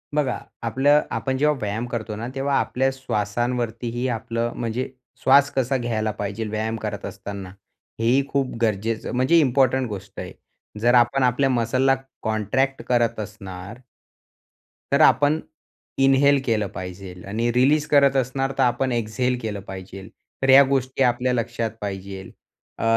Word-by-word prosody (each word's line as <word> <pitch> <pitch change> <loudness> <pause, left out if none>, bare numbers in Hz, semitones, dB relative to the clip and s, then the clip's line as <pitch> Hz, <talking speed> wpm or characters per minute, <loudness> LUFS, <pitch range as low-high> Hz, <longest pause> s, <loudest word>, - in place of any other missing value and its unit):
बघा, 145 -4 0 0.2
आपलं 135 +6 +3
आपण 130 -1 -1
जेव्हा 150 +2 +3
व्यायाम 105 +3 -2
करतो 115 -3 -4
ना, 115 +3 -5
तेव्हा 135 +1 0
आपल्या 130 +1 0
श्वासांवरतीही 120 0 -2
आपलं 115 0 -2
म्हणजे 120 +2 -3 0.3
श्वास 140 +2 +5
कसा 130 0 +1
घ्यायला 110 -3 -1
पाहिजे 105 +1 -4
व्यायाम 110 +1 -2
करत - - -4
असताना, 100 -2 -7 0.5
हे 115 - -1
ही 135 +3 +4
खूप 140 -2 -1
गरजेचं 110 0 -1
म्हणजे 130 +7 +4
इम्पोर्टंट 130 -2 +2
गोष्ट 100 -1 -8
आहे. - - -6 0.5
जर 120 +3 +3
आपण 125 +2 +4
आपल्या 125 +2 +2
मसलला 130 +2 +2 0.3
कॉन्ट्रॅक्ट 120 +5 0
करत 120 -2 +2
असणार 100 0 -8 1.1
तर - - +4
आपण 150 +2 +5 0.6
इन्हेल 135 +1 +5
केलं 110 -4 +1
पाहिजेल 90 0 -8
आणि 115 +4 0
रिलीज 145 +5 +3
करत 140 -2 +4
असणार 135 +1 0
तर 135 - +3
आपण 125 +1 +1
एक्झेल 120 +2 -1
केलं 105 -3 -4
पाहिजे. 95 0 -8 0.3
तर 135 - +1
या 135 +1 +9
गोष्टी 135 -1 0
आपल्या 125 0 +1
लक्षात 115 -1 -2
पाहिजेल 95 -1 -6 0.5
अ, - - -2
120 Hz, 145 wpm, -23 LUFS, 110-135 Hz, 1.1 s, या